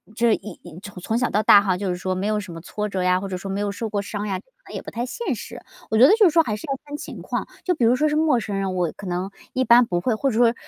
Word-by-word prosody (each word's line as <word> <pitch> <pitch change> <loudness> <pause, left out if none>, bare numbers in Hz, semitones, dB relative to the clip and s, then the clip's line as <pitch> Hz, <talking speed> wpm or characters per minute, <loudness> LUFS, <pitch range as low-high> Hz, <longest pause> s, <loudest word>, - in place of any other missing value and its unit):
这 230 0 +3
一 210 +1 -6
一 175 -1 -11 0.2
从 225 - 0
小 245 0 +1
到 210 - +1
大 205 - +8
哈 190 -3 0
就 195 +1 -3
是 180 - -2
说 185 +1 -2
没 185 +2 -3
有 215 0 +1
什 185 -4 -8
么 165 - -8
挫 210 +4 -4
折 190 -2 -2
呀， 180 0 +3
或 195 - -5
者 190 - -4
说 195 +1 -5
没 195 - -2
有 205 0 -1
受 220 +2 -4
过 205 -1 -1
伤 205 +1 -5
呀， 190 -2 -2
可 - - -19 0.2
能 - - -10
也 - - -4
不 - - -8
太 235 +1 -3
现 450 - -3
实。 - - -9 0.3
我 220 - +1
觉 240 - +8
得 - - +6
就 435 0 +5
是 - - +7
说 330 +1 +4
还 215 -7 -2
是 210 - -8
要 270 - -2
看 290 0 -7
情 295 - -8
况， - - -3 0.2
就 360 - +1
比 260 - -1
如 235 +2 +4
说 305 - +2
是 300 - 0
陌 305 -5 +3
生 205 -2 -4
人， 195 -1 -1
我 175 -3 -1
可 205 - -10
能 180 +2 -2 0.2
一 260 0 0
般 240 0 +7
不 175 -5 -1
会， 230 +5 0
或 270 +5 0
者 220 - -2
说， 235 -1 +5
210 Hz, 360 characters per minute, -23 LUFS, 190-245 Hz, 0.3 s, 大